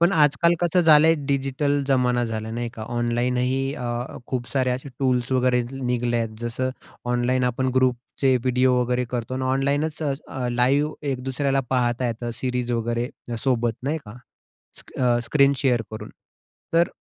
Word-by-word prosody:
पण 170 +3 +4
आजकाल 155 +1 +4
कसं 175 +1 +3
झालं 155 -2 +7
आहे 165 - +6
डिजिटल 140 +1 0
जमाना 125 -2 +2
झाला, 110 -1 -4
नाही 120 +1 -3
का? 110 - -7
ऑनलाईनही 125 +3 0
अ, 125 - -6 0.4
खूप 125 -2 -3
सारे 130 -2 +1
असे 130 +3 -3
टूल्स 125 -2 +1
वगैरे 125 -1 +3
निघले 125 -2 -1
आहेत. 115 -2 -2
जसं 120 +2 -2 0.4
ऑनलाईन 125 +1 +1
आपण 125 +1 0
ग्रुपचे 130 +1 +1
व्हिडिओ 125 +1 +2
वगैरे 125 +1 0
करतो 125 0 -3
आणि 130 0 -2
ऑनलाईनच 140 +4 0
अ, 135 -3 -3
लाईव्ह 140 +5 +2 0.2
एक 125 -1 -5
दुसऱ्याला 135 +1 0
पाहता 125 -1 +1
येतं 120 0 -3
सीरीज 125 -1 -1
वगैरे 120 +1 -1 0.3
सोबत, 120 -3 +1
नाही 145 +5 -1
का? 105 +2 -11 0.6
स - - -7 0.2
अ, 120 -2 +3
स्क्रीन 140 0 +4
शेअर 125 -4 +1
करून. 110 - -7 0.6
तर 170 +1 +4
125 Hz, 160 wpm, -24 LUFS, 120-135 Hz, 0.6 s, झालं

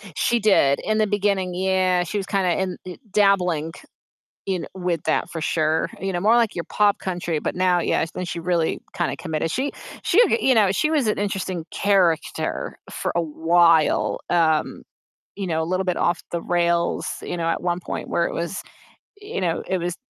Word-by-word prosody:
She 235 +8 +1
did, 190 -10 +4
in 215 0 0
the 215 -1 +2
beginning, 200 -3 0
yeah, 185 -1 +1
she 175 +4 -4
was 195 - -2
kinda 185 -3 0
in, 185 -2 -2
uh 180 - -6 0.2
dabbling 180 -6 +2 0.7
in 190 -3 -2
with 180 -4 -2
that, - - 0
for 165 - -5
sure, 155 0 +1
you 195 0 -2
know, 175 - -2
more, 215 +6 +4
like, 230 -3 +2
your 170 - -3
pop 205 -1 +2
country, 175 -4 -2
but - - -3
now, 180 -1 +2
yeah - - +1
then 180 - -3
she 170 - -4
really 170 -1 0 0.2
kinda 175 - -1
committed. 160 -1 -2
She 270 - -1 0.3
she 365 - +3
ge 460 - +1
you 260 - +4
know, 205 -4 +4
she 305 +10 +1
was 285 -7 +2
an 215 - +1
interesting 190 -4 -3
character 185 -6 0
for - - -3
a 170 - +2
while. 165 0 +3
Um, 160 -3 +1 0.5
you 195 -1 -3
know, 160 -2 0
a - - -1
little 185 +3 -1
bit 180 -2 -1
off 175 0 0
the 170 -1 -3
rails, 170 -1 +1 0.2
you - - -4
know, 165 - -1
at 165 - -1
one 175 0 -1
point, - - -5
where 170 - +1
it - - -5
was 170 +3 -3 0.6
you 410 - -5
know, 170 -3 -1
it 190 - 0
was 175 0 -3
180 Hz, 195 wpm, -23 LUFS, 170-195 Hz, 0.7 s, did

